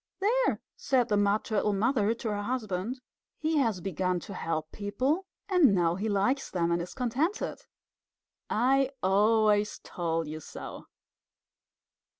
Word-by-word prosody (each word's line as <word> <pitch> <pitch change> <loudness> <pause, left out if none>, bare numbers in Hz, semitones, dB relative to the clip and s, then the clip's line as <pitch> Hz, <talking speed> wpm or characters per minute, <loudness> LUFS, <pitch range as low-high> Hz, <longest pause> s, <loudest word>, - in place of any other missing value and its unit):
"There!" 470 +6 +2 0.2
said 260 -4 +1
the 210 - +3
Mud 205 +1 +2
Turtle 210 -1 0
Mother 220 +1 +2
to 225 - -4
her 205 0 -2
husband. 220 0 -2 0.4
"He 315 0 0
has 225 -10 +1
begun 185 0 -1
to 200 - -8
help 160 -3 -3
people, 265 - -1 0.2
and 345 - +5
now 170 -2 +2
he 205 +5 -2
likes 210 +7 +1
them, 170 -2 0
and 170 0 +1
is 175 - -7
contented, 270 - -1 0.9
I 265 +3 +3
always 210 +2 +3
told 165 -2 -2
you 155 +1 -5
so!" - - -9
210 Hz, 140 wpm, -29 LUFS, 185-260 Hz, 0.9 s, and